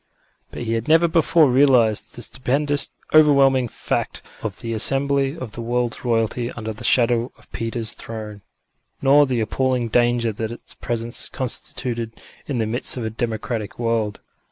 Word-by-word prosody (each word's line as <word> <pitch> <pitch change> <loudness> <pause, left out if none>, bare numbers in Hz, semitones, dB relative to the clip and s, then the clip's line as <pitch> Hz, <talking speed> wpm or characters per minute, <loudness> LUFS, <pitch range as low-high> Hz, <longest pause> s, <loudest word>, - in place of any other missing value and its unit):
But - - -7
he 115 -1 -2
had 115 0 -2
never 165 +2 +5
before 160 -3 +3
realised 125 -5 +3
the 120 - -3
stupendous, 145 +3 0 0.2
overwhelming 140 -4 +5
fact - - -3 0.2
of - - -5
the 115 0 -4
assembly 135 +5 +3
of 130 -8 -7
the 120 - -7
world's 120 0 -2
royalty 120 0 0
under 110 -1 -5
the 110 +3 -11
shadow 120 0 +2
of - - -23
Peter's 115 -1 -2
Throne, 105 -2 -8 0.6
nor 140 +1 +5
the 125 -3 0
appalling 125 +2 0
danger 120 0 +2
that 110 +2 -4
its 120 - -10
presence 120 0 -1
constituted 120 -2 -2 0.3
in 140 - -2
the 110 - 0
midst 120 +4 +1
of 120 - -3
a 110 - -3
democratic 110 -1 -4
world. 115 -3 -1
120 Hz, 155 wpm, -21 LUFS, 115-135 Hz, 0.6 s, never